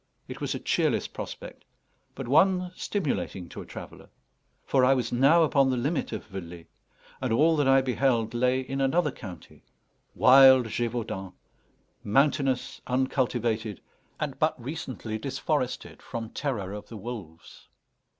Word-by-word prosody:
It - - -8
was - - -2
a - - -4
cheerless - - +1
prospect, - - -8 0.5
but 135 -2 -6
one 180 +6 +3
stimulating 145 - -3
to - - -8
a - - -11
traveller. - - -10 0.6
For 130 -2 +2
I 135 +1 +5
was 120 -3 -2
now 140 +7 +5
upon 140 -3 +3
the 130 - 0
limit 145 +6 -1
of - - -5
Velay, 90 -4 -9 0.6
and 130 -3 -1
all 155 +8 +4
that 145 -2 +2
I 135 0 +6
beheld 125 -3 +1
lay 125 +2 +2
in 135 +1 -4
another 150 +3 +2
county 95 -8 -11 0.5
wild 130 -1 +7
Gévaudan, 110 -5 -3 0.7
mountainous, 135 +2 +1
uncultivated, 120 - -1 0.4
and 145 -3 -4
but 155 -2 +1
recently 125 -5 -5
disforested 135 0 -3
from 115 -2 -6
terror 110 -10 -3
of 105 0 -8
the 115 - -9
wolves. 100 -7 -9
130 Hz, 140 wpm, -27 LUFS, 115-140 Hz, 0.7 s, wild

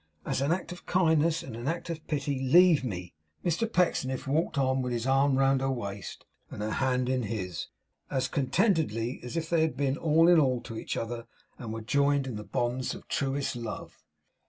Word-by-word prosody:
As - - -1
an 140 +3 +1
act 180 +1 -1
of 180 - -10
kindness 165 -2 +2
and 125 -4 -8
an 120 +3 -5
act 170 +1 -2
of 160 -1 -7
pity, 145 -3 -1
leave 160 +3 +5
me!' 90 -7 -5 0.3
Mr 180 +7 0
Pecksniff 135 -8 +1
walked 150 +3 0
on 130 -1 +2
with 125 -1 -2
his 120 -1 -2
arm 135 +1 +3
round 135 0 +3
her 135 - 0
waist, 100 -7 -5 0.2
and - - -8
her 105 +1 -2
hand 130 -1 +1
in 130 0 +1
his, 100 -6 -4 0.4
as 130 -1 0
contentedly 140 - +1
as 125 +6 -5
if 160 -1 -2
they 165 -1 +2
had 160 0 0
been 140 0 0
all 165 +1 +4
in 175 -2 +7
all 130 -4 +2
to 115 - -8
each - - -4
other, 115 0 -4 0.3
and 115 -3 -6
were 115 0 -4
joined 140 +4 +2
in 130 -4 -4
the 105 - -5
bonds 120 +3 -2
of - - -12
truest 140 -1 -1
love. 115 -2 -6
135 Hz, 205 wpm, -29 LUFS, 120-160 Hz, 0.4 s, in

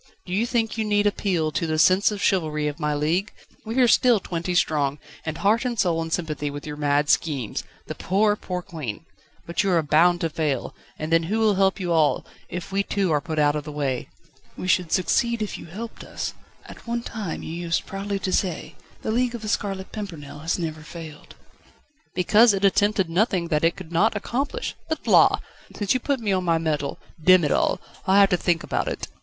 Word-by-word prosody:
Do 180 - -6
you 220 +5 +1
think 225 -2 -1
you - - +2
need 205 -1 +2
appeal 180 -6 0
to 165 - -1
the 155 0 0
sense 185 +5 +5
of 205 -2 -4
chivalry 155 -6 +1
of 150 +2 -4
my 150 -1 0
league? 165 +8 0 0.4
We 225 +3 -3
are 245 - +6
still 235 -1 +5
twenty 175 -1 -3
strong, 145 -4 +1 0.3
and 160 - -2
heart 215 +4 +2
and 245 -2 -2
soul 170 -4 +1
in 165 - -4
sympathy 155 -3 -2
with 145 0 -7
your 150 -1 -5
mad 145 0 +1
schemes. 140 -9 0 0.2
The - - -5
poor, 205 +2 +2
poor 180 -3 -5
Queen! 155 -5 -6 0.4
But 170 - 0
you 200 - 0
are 170 -3 +3
bound 170 +4 +4
to 165 - 0
fail, 150 -5 -1 0.2
and 155 +1 -5
then 165 - +5
who 190 +7 -1
will 220 -2 +3
help 195 +1 +2
you 180 -2 -2
all, 160 -3 +2 0.2
if 175 +2 -6
we 195 +1 +1
too 200 -3 0
are 150 -2 +2
put 160 -1 -5
out 145 -1 +3
of 150 - -2
the 150 - -7
way?" 140 -4 -2 0.5
"We 185 - -5
should 180 -2 +2
succeed 235 +5 +1
if 215 -2 -3
you - - -10
helped 220 +7 -8
us. - - -5 0.3
At - - -13
one 235 0 -2
time 210 -9 -5
you 160 - -6
used 170 0 -1
proudly 200 +1 -3
to 185 - -1
say: 180 -5 -1 0.3
'The - - -1
League 245 +1 +1
of 230 - -7
The 215 - -3
Scarlet 195 -2 -2
Pimpernel 160 -9 -7
has 160 +3 -1
never 160 -3 -4
failed.'" 155 -1 -10 0.8
"Because 210 +4 +5
it 195 +1 +1
attempted 200 -1 +3
nothing 180 0 +1
which 150 -2 0
it 165 - +3
could 175 -4 -10
not 200 +7 +2
accomplish. 275 - -3 0.2
But, 315 - -3
la! - - +6 0.4
since 205 -2 +1
you 255 - +1
put 275 +1 -1
me 215 -3 -1
on 185 -1 +1
my 165 -2 +2
mettle 155 -3 -2 0.3
Demm 185 0 +7
it 145 - 0
all! - - +2 0.3
I'll 190 +1 +5
have 195 - +6
to 180 - +3
think 175 0 0
about - - -2
it!" - - -3
180 Hz, 220 wpm, -24 LUFS, 155-205 Hz, 0.8 s, Demm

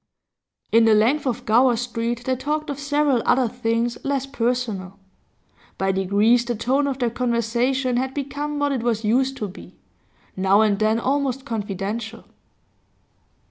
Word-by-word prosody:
In 230 0 +5
the 220 -1 +5
length 255 +8 +2
of 245 - -3
Gower 240 +3 +4
Street 235 0 -3
they 260 - +1
talked 300 +3 -3
of 285 - -6
several 290 -3 +1
other 255 -1 +3
things 235 0 -1
less 275 -1 -1
personal. 230 -7 -2 0.8
By 195 0 +1
degrees 200 +5 +3
the 240 0 -3
tone 265 +6 +1
of 270 -2 -2
their 245 -3 0
conversation 245 +2 0
had 265 +1 -2
become 290 +1 -4
what 290 0 0
it 265 -4 -1
was 230 -2 -1
used 260 +5 +1
to 210 - -3
be, 185 - -12 0.6
now 195 +2 +3
and 210 -2 +2
then 215 +1 +2
almost 270 0 -1
confidential. 215 0 -4
240 Hz, 150 wpm, -22 LUFS, 220-270 Hz, 0.8 s, In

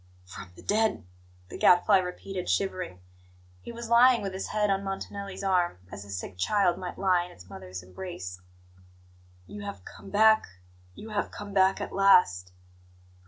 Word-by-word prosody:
"From 90 0 -11
the - - -14
dead 220 - 0 0.2
" 90 0 -29
the - - -8
Gadfly 180 +2 +5
repeated, 180 0 -5
shivering. 185 - -2 0.6
He - - -8
was 235 0 -7
lying 235 0 +5
with 195 -1 -4
his 190 - -4
head 210 -1 0
on 195 0 0
Montanelli's 195 0 -6
arm, 180 - +1
as 100 0 -8
a 100 - -14
sick 95 -1 -6
child 185 - +2
might 180 -1 -6
lie 185 -2 +2
in 180 - -11
its 90 0 -15
mother's 90 -1 -8
embrace. 90 - -8 1.0
"You 205 - -9
have 200 0 -8
come - - -12
back 220 +2 +4 0.5
you 220 - -10
have 210 - -1
come 205 -1 -9
back 190 0 +3
at - - -5
last!" 180 - +4
190 Hz, 165 wpm, -28 LUFS, -, 1.0 s, Gadfly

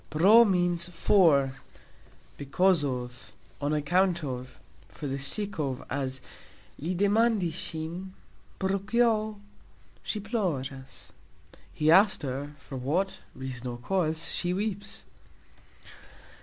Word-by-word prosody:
"Pro" 195 +10 +7
means 175 -3 +1
"for, 160 -7 +3 0.8
because 170 +4 +2
of, 125 -4 -5 0.3
on 145 +1 0
account 170 +3 +2
of, 130 -2 -6 0.3
for - - -9
the 135 0 -2
sake 205 +7 -2
of" 135 -4 -1
(cause), - - -13
as 130 -1 -2 0.6
"Li 170 +6 -2
demandis 205 -2 +2
sxin, 165 +3 -5 0.5
pro 190 0 0
kio 215 0 +1 0.6
sxi 210 - -3
ploras", 140 - -4 0.6
He 155 +1 +2
asked 195 -1 +5
her, 140 +2 -4
for 135 0 -8
what 185 +9 -1 0.2
(reason 130 -2 -6
or 120 -1 -4
cause) 160 +3 -1
she 180 0 -1
weeps. 205 0 -4
165 Hz, 115 wpm, -28 LUFS, 135-195 Hz, 0.8 s, Pro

